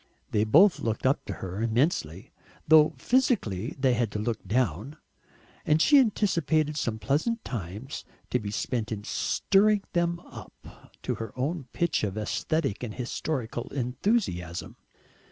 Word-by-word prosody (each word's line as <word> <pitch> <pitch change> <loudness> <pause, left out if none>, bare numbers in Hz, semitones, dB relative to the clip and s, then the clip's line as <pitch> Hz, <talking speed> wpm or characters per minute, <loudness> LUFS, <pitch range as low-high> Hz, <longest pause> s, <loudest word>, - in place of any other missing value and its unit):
They 105 0 +2
both 170 - +6
looked 110 +1 -2
up 135 +3 +2
to - - -4
her 95 +3 -5
immensely, 115 - 0 0.4
though 155 0 +6
physically 135 - +1
they 130 -2 +3
had 120 -2 0
to - - -2
look 110 +2 -2
down, 120 - -1 0.7
and 155 +1 +3
she 285 - +6
anticipated 165 - +1
some 115 -6 -2
pleasant 160 - -1
times 110 - -6 0.3
to 125 - +2
be 105 -3 -5
spent 110 +2 -2
in 105 -2 -4
"stirring 200 - +2
them 170 0 +1
up" - - -13 0.4
to - - -1
her 110 -2 -5
own 140 +2 -2
pitch 170 -8 0
of 105 -1 -2
aesthetic 110 - -1
and 110 -4 -5
historical 125 -1 -3
enthusiasm. 125 - -1
130 Hz, 140 wpm, -27 LUFS, 110-165 Hz, 0.7 s, both